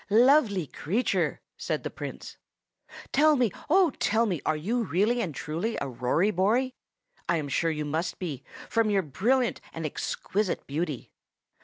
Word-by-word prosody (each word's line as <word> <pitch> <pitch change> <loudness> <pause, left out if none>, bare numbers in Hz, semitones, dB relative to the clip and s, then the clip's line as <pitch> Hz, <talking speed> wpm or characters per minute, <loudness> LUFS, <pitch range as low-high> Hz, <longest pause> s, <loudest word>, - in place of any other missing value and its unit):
"Lovely 225 - +5
creature!" 195 - -1 0.2
said - - -2
the - - -4
Prince, - - -7 0.8
"tell 305 +2 +5
me, 245 -6 +2 0.2
oh, 360 -1 +5
tell 225 +2 +2
me, 180 -9 -1
are 155 - +2
you 225 +11 -1
really 215 +6 +1
and 165 - -3
truly 165 - -3
a 140 - -3
Rory 130 - +1
Bory? 225 +8 +2 0.6
I 170 - +3
am 150 -2 -3
sure 165 +4 +1
you 150 -1 -2
must 160 +4 -2
be, 150 -8 -5 0.2
from 230 -2 +2
your 200 -2 +2
brilliant 235 - +1
and 165 -1 -4
exquisite 190 +6 -2
beauty." 150 -2 -3
195 Hz, 155 wpm, -27 LUFS, 155-235 Hz, 0.8 s, Lovely